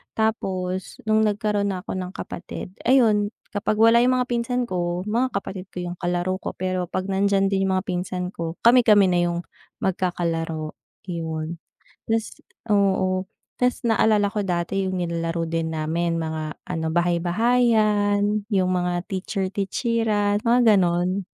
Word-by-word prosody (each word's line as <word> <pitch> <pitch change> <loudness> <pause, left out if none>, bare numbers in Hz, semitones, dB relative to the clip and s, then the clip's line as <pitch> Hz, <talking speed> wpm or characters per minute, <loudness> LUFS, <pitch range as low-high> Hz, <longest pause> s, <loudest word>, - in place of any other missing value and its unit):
Tapos, 190 -5 -2
nung 215 0 +2
nagkaro'n 205 0 0
na 185 -2 -3
'ko - - -6
ng 185 +1 -6
kapatid, 180 - -7 0.2
ayun 220 -5 +4 0.2
kapag 205 +1 -1
wala 230 +1 +6
yung 250 +1 +3
mga 250 - +1
pinsan 240 +1 0
ko, 175 -3 -2
mga 235 +5 -1
kapatid 195 -1 -4
ko 180 -2 -6
yung 175 0 -5
kalaro 180 +1 -1
ko. - - -6
Pero 185 -1 -2
'pag 185 +2 -3
nandiyan 195 0 +2
din 195 0 +1
yung 190 - +1
mga 185 - -1
pinsan 180 0 -3
ko, 165 0 -4
kami-kami 230 -4 +6
na 175 - +2
yung 170 0 -2 0.4
magkakalaro, 165 -4 -1 0.4
yun. 160 0 -4 0.5
'Tas 225 -1 -1 0.3
oo, 190 -3 +2 0.3
'tas 250 0 +1
naalala 215 -2 +3
ko 205 0 -2
dati 180 +1 -1
yung 185 -1 -2
nilalaro 165 -1 -2
din 165 0 -2
namin 165 +2 -1
mga 160 -1 -4
ano, 165 -3 -3
bahay-bahayan, 205 +3 +2
yung 190 -3 +2
mga 180 0 0
teacher-teacheran 205 +2 -1
mga 235 -2 +5
ganon, 180 +1 +1
190 Hz, 145 wpm, -23 LUFS, 175-210 Hz, 0.5 s, wala